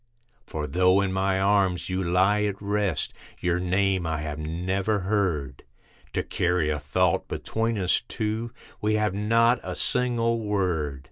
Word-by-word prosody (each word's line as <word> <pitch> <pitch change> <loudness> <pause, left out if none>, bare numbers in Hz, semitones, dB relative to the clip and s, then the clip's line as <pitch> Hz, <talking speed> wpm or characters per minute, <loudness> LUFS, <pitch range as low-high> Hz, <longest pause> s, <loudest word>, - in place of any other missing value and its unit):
For 75 -1 -4
though 90 +5 +3
in 95 -1 -1
my 95 0 +1
arms 95 -2 +2
you 95 +1 -1
lie 95 +4 +3
at 100 -1 -2
rest, 100 -5 -1 0.3
your 90 0 0
name 95 0 +1
I 80 -1 -1
have 75 -1 -4
never 95 +6 -1
heard, 90 -10 -1 0.5
To - - 0
carry 90 -3 0
a 75 - -1
thought 90 +5 +1
between 115 0 -2
us 90 -3 +2
two, 110 +1 -3 0.3
we 110 +1 +1
have 105 -3 +1
not 115 +4 +3
a - - -5
single 115 -2 +1
word. 90 -10 -1
95 Hz, 150 wpm, -26 LUFS, 90-105 Hz, 0.5 s, though